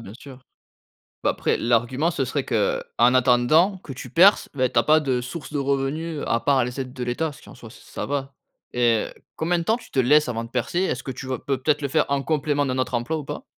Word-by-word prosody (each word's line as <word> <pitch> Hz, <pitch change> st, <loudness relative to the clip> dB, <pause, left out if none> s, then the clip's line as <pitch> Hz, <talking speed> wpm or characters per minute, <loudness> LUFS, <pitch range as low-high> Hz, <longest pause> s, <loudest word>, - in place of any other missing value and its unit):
bien 100 Hz, -3 st, -10 dB
sûr. 135 Hz, -2 st, -12 dB, 0.8 s
Bah, -, -, +3 dB
après -, -, -1 dB
l'argument 125 Hz, +7 st, +1 dB
ce 135 Hz, -, -1 dB
serait 135 Hz, +2 st, -2 dB
qu'en 110 Hz, -5 st, 0 dB, 0.3 s
attendant 130 Hz, +10 st, +4 dB
que 145 Hz, -7 st, -9 dB
tu 125 Hz, -, -9 dB
perces, 190 Hz, +5 st, +5 dB
bah, 130 Hz, -2 st, +1 dB
tu 120 Hz, -, -4 dB
as -, -, +2 dB
pas 155 Hz, +1 st, +5 dB
de 130 Hz, -4 st, -1 dB
source 140 Hz, +4 st, -7 dB
de -, -, -1 dB
revenus 140 Hz, +3 st, -2 dB
à 115 Hz, -, +1 dB
part 135 Hz, -3 st, +3 dB
les 125 Hz, +2 st, -6 dB
aides 130 Hz, -1 st, -7 dB
de 125 Hz, -2 st, -5 dB
l'État, 150 Hz, +6 st, -1 dB
ce -, -, -15 dB
qui -, -, -18 dB
en -, -, -12 dB
soit 115 Hz, -2 st, -12 dB
ç 115 Hz, -, -15 dB
ça -, -, -6 dB
va. 140 Hz, -1 st, -3 dB, 0.4 s
Et 120 Hz, -3 st, +2 dB
heu, -, -, -12 dB, 0.2 s
combien 170 Hz, +2 st, 0 dB
de -, -, -3 dB
temps 225 Hz, +7 st, +1 dB
tu -, -, -16 dB
te 135 Hz, -, 0 dB
laisses 150 Hz, +4 st, +4 dB
avant 115 Hz, -1 st, -3 dB
de 115 Hz, -, -9 dB
percer? 130 Hz, +8 st, -2 dB
Est-ce 130 Hz, -9 st, -1 dB
que 130 Hz, -, -5 dB
tu 130 Hz, +2 st, -8 dB
vas 130 Hz, -2 st, -3 dB
peut-être 145 Hz, +2 st, 0 dB
le 140 Hz, -, -1 dB
faire 155 Hz, +3 st, +2 dB
en 140 Hz, -1 st, +1 dB
complément 145 Hz, -1 st, 0 dB
d'un 130 Hz, -1 st, -2 dB
autre 130 Hz, 0 st, -2 dB
emploi 120 Hz, +7 st, -1 dB
ou 150 Hz, -, -5 dB
pas? -, -, -7 dB
135 Hz, 255 wpm, -23 LUFS, 125-150 Hz, 0.8 s, perces